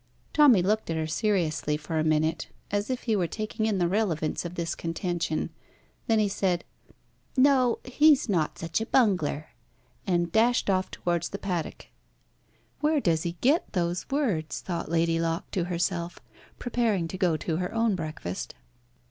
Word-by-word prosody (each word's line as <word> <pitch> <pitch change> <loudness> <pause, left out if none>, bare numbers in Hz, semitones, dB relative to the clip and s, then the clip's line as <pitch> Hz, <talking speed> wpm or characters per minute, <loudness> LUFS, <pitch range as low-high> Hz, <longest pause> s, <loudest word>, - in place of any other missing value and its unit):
Tommy 265 -11 +6
looked 215 +2 0
at 165 - 0
her 160 0 -1
seriously 155 -3 0
for 160 +1 -3
a - - +2
minute, 155 +1 +1 0.2
as 205 +2 -1
if 255 -1 -2
he 225 -3 +1
were 180 -4 +1
taking 215 +3 -2
in 210 -3 +1
the 175 -2 +2
relevance 170 -6 0
of 175 0 -6
this 170 -1 -2
contention. 170 -1 -2 0.6
Then 225 - +3
he 215 -1 +3
said 190 -3 0 0.7
"No, 260 -3 +4
he's 290 +2 +4
not 170 -7 0
such 165 +5 -2
a 225 - -3
bunger," 180 - +2 0.6
and 175 -2 +1
dashed 225 0 +3
off 185 0 0
towards 170 -1 -2
the 200 - -5
paddock. 180 -5 -4 0.9
"Where 300 0 +2
does 165 - +1
he 170 0 -2
get 290 +7 +2
those 175 -1 -1
words?" 225 - -1
thought 175 -4 -4
Lady 165 0 +2
Locke 165 +1 -2
to 180 -4 -1
herself, 175 -1 -2 0.4
preparing 225 -8 0
to 175 - -7
go 175 -5 +2
to 160 +1 -2
her 180 +1 -2
own 225 -1 +2
breakfast. 155 - -5
180 Hz, 165 wpm, -27 LUFS, 165-220 Hz, 0.9 s, Tommy